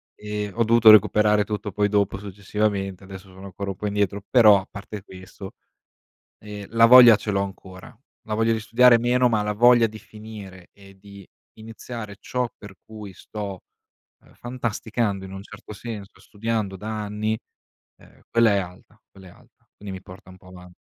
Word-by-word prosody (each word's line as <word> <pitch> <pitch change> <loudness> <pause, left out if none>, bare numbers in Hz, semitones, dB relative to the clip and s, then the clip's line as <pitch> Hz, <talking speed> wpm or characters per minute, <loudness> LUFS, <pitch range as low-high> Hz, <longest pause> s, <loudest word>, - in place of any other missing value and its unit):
Ehm, 105 -1 -5
ho 115 - +2
dovuto 115 0 +5
recuperare 105 0 +4
tutto 105 0 -5
poi 105 0 0
dopo 100 -2 0
successivamente, 100 -1 -3
adesso 95 0 -11
sono 95 +1 -12
ancora 100 +1 -6
un - - -8
po' 105 - -5
indietro, 100 0 -2
però 110 -5 +6
a - - -16
parte 100 0 -9
questo, 95 0 -12 0.9
ehm, 105 -2 -9
la 115 0 +4
voglia 120 -2 +9
ce 105 0 -5
l'ho 100 0 0
ancora. 95 +2 -10 0.3
La 110 - -3
voglia 115 +1 +1
di 110 - -2
studiare 120 +2 +5
meno, 125 +1 +2
ma 110 -2 +1
la 105 0 -2
voglia 120 +1 +5
di 110 0 -10
finire 105 -4 -12
e 95 -1 -18
di 100 -1 -14 0.3
iniziare 110 -1 -9
ciò 125 -1 -3
per 100 -2 -13
cui 105 -3 -10
sto, 100 -1 -8 0.6
ehm, - - -22
fantasticando, 115 -4 -3
in 95 - -10
un 95 +1 -8
certo 105 - -12
senso, 105 -2 -9
studiando 105 -2 -4
da 110 +2 -5
anni, 105 +1 -3 0.6
ehm, - - -22
quella 115 -2 +4
è - - +2
alta, 95 +4 -9
quella 95 -1 -16
è - - -14
alta, - - -24
Quindi 100 -2 -8
mi - - -12
porta 95 0 -14
un 95 - -14
po' 95 -1 -19
avan 90 -1 -14
105 Hz, 180 wpm, -23 LUFS, 95-110 Hz, 0.9 s, voglia